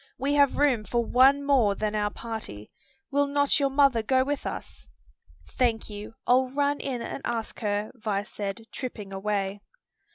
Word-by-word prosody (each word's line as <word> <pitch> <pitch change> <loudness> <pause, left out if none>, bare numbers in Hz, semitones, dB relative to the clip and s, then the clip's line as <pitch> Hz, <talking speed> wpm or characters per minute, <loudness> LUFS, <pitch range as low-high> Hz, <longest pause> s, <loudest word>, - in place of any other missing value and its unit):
We 275 +3 0
have 285 -2 +4
room 270 -7 +3
for 235 +2 -1
one 270 +4 +5
more 245 -8 +3
than 215 0 -2
our 210 -1 0
party. 210 - -7 0.4
Will 285 0 +2
not 285 +1 +2
your 280 -1 +2
mother 270 -4 +4
go 260 +4 +2
with 285 +1 -3
us?" - - -7 0.6
"Thank 225 - 0
you; 210 +2 -8
I'll 255 +1 +4
run 285 +2 0
in 250 -4 -3
and - - -5
ask 230 -2 -3
her," 205 -1 -1
Vi 210 -5 -2
said, 205 0 -5
tripping 210 -7 -6
away. 200 0 -2
235 Hz, 165 wpm, -27 LUFS, 210-275 Hz, 0.6 s, one